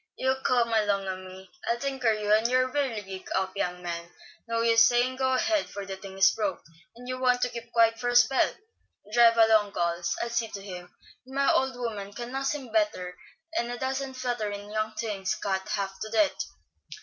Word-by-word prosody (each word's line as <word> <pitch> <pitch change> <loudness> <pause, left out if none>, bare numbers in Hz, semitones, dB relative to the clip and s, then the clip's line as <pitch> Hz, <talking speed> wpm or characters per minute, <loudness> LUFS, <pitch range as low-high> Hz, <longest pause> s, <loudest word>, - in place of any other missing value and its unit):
"You 260 0 +2
come 235 -2 +2
along 205 -3 +2
a 190 - -2
me. 185 0 -11 0.2
I'll 235 - +1
tinker 265 -2 0
you 210 -1 +1
and 220 +2 +4
your 255 +1 +2
whirligig 215 -10 -3
up, 190 0 -1
young 180 -3 -2
man. 170 -1 -5 0.4
No 230 0 0
use 230 -1 +6
sayin' 245 +2 +3
go 260 0 +1
ahead, 320 +3 +1
for 200 0 -6
the 195 0 -5
thing 190 0 -10
is 190 0 +6
broke, 200 -5 -2 0.3
and 245 +1 -12
you 255 0 -3
want 250 -1 +3
to 250 - +1
keep 235 -1 -8
quiet 230 -1 +4
for 245 - -1
a 245 - -1
spell. 245 +2 +5 0.6
Drive 235 -1 +6
along, 220 -3 +5
gals, 170 0 -1
I'll 235 - -4
see 235 -1 0
to 200 -2 -8
him; 180 -2 -8 0.4
and 265 - -10
my 275 0 +3
old 265 -1 +1
woman 210 -5 -5
can 240 +3 -6
nuss 270 +2 -1
him 260 -6 -8
better 205 -5 0 0.4
'n 235 - -2
a 245 - -4
dozen 265 +1 -3
flutterin' 215 -5 -3
young 215 0 -2
things 210 -4 -2
scat 190 -2 -2
half 195 -2 -3
to 215 - -5
death." 290 +7 +1
225 Hz, 205 wpm, -27 LUFS, 195-250 Hz, 0.6 s, use